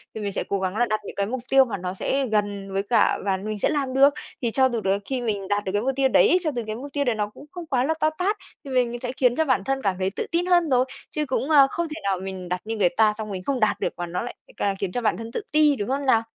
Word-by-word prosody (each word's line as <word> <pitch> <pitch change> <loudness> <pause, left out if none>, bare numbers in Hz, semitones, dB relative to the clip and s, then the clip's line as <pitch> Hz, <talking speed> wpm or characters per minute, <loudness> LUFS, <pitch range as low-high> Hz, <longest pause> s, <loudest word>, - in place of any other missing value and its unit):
thì 220 - -4
mình 200 -1 -2
sẽ - - -2
cố 200 - 0
gắng 190 +2 -2
là 240 - +3
đặt 215 -2 -1
những - - -8
cái 200 - 0
mục 245 +4 -4
tiêu 270 0 +6
mà 220 -5 -4
nó 180 0 -4
sẽ 270 +8 0
gần 205 -2 -1
với 195 0 0
cả 230 +3 +3
và 195 -1 +1
mình 210 +2 -5
sẽ - - +2
làm 275 -4 -1
được. 275 +2 +6 0.3
Thì 235 -3 0
cho 260 +2 +3
dù 235 -3 -2
tới 195 +1 +1
khi 260 +1 -2
mình 205 -5 -2
đạt 205 +1 0
được 190 - -2
cái 205 +1 0
mục 265 +4 +1
tiêu 270 0 +3
đấy 360 - +5
cho 310 - 0
từ 240 - -2
cái 215 - -3
mục 275 +4 -8
tiêu 285 - +1
đấy 245 -3 +1
nó 210 -1 -1
cũng 210 - -14
không 350 -2 -7
quá 260 -5 +1
là 310 +4 +1
to 310 - +3
tát. 405 +4 0 0.3
Thì 275 - -8
mình 240 -2 +1
sẽ 250 0 -3
khiến 250 -2 +2
cho 320 - +2
bản 255 -9 +2
thân 270 +4 -1
cảm 195 -5 0
thấy 185 - +1
tự 195 - -4
tin 340 +1 +1
hơn 350 -3 +3
rồi. 255 -1 +3 0.3
Chứ 305 -1 -1
cũng, 265 +2 -2
ơ, 280 -3 +7
không 340 0 -2
thể 310 +1 -7
nào 195 -2 0
mình 190 -1 -6
đặt 180 0 -2
như 225 +1 -3
người 185 -4 +4
ta 215 +3 +3
xong 215 -1 -5
mình 185 -2 -5
không 275 +2 -1
đạt 215 - +2
được - - -1
và 175 - -3
nó 175 +1 -3
lại 245 - -6 0.2
ca 200 -1 0
khiến 195 -1 -3
cho 245 - -2
bản 225 - +1
thân 230 0 -7
tự - - -3
ti, 300 -1 +4
đúng 205 -2 -4
không 275 +1 -1
nào? 230 -4 +4
235 Hz, 325 wpm, -24 LUFS, 200-270 Hz, 0.3 s, ơ